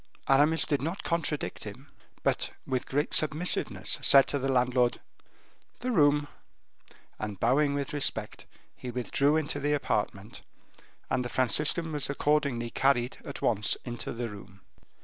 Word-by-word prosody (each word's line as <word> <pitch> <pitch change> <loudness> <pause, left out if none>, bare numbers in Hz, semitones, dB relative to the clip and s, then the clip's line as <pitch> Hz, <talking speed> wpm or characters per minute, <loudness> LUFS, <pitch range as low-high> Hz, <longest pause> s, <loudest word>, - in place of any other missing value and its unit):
Aramis 150 +4 +4
did 145 -4 0
not 165 +6 -4
contradict 165 -3 -2
him, - - -9 0.4
but, - - +1 0.2
with 130 -1 -2
great 145 +3 -1
submissiveness, 155 +3 0
said 135 -1 +7
to 145 - -1
the 135 +1 -1
landlord: 125 -1 +2 0.8
"The 255 - -1
room." 145 -6 +3 0.9
And 105 -3 -5
bowing 140 +4 +2
with 140 0 -3
respect 145 -2 0 0.3
he 125 - -8
withdrew 130 +4 +1
into 150 -2 -1
the 145 +1 0
apartment, 105 -6 -2 0.7
and 125 - +1
the 120 - -5
Franciscan 150 - +2
was 145 -3 -2
accordingly 140 -5 0
carried 130 -2 +1
at - - -8
once 105 -2 +1
into 120 -2 -5
the 120 0 -4
room. 100 -2 -12
140 Hz, 140 wpm, -28 LUFS, 120-150 Hz, 0.9 s, said